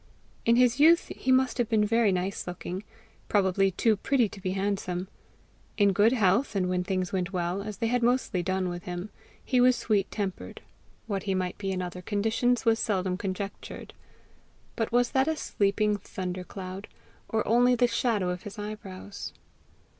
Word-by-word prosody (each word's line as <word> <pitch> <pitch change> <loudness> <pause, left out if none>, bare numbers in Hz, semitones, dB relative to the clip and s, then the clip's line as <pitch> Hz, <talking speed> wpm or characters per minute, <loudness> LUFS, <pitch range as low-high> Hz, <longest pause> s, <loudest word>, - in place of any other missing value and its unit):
In 230 - +6
his 250 +1 +4
youth 335 +3 +6
he 260 - -1
must 260 0 +3
have 240 - +1
been 215 -2 +3
very 225 -1 +3
nice 185 +1 -2
looking, 180 +2 -5 0.5
probably 195 -1 +3
too 215 +4 +2
pretty 250 +2 +2
to 195 - -11
be 185 0 -2
handsome. 190 -2 -2 0.7
In 200 -2 +4
good 210 +5 +4
health 220 +1 +2
and 185 -2 +1
when 180 0 0
things 185 0 -2
went 185 0 -1
well, 180 +1 -1
as 210 0 -6
they 230 - -1
had 245 +2 +1
mostly 240 -6 +1
done 185 +1 -1
with 175 0 -6
him, 180 +3 -5 0.3
he 255 -2 +3
was 250 0 +6
sweet 205 -5 0
tempered; 200 -3 -5 0.4
what 200 -3 -2
he 190 - +2
might 185 -1 -2
be 195 -1 -2
in 185 -1 -2
other 180 0 -6
conditions 225 +5 0
was 225 0 +3
seldom 185 -4 0
conjectured. 195 +1 -6 0.8
But 225 -1 -2
was 245 0 +2
that 265 +1 +2
a 320 -1 0
sleeping 205 -3 +1
thunder 185 -2 -5
cloud, 190 +1 -7 0.4
or 220 -1 0
only 245 +2 +4
the 245 - +4
shadow 225 -6 0
of 180 0 -5
his 205 +1 -9
eyebrows? 205 -2 -7
205 Hz, 175 wpm, -28 LUFS, 185-230 Hz, 0.8 s, In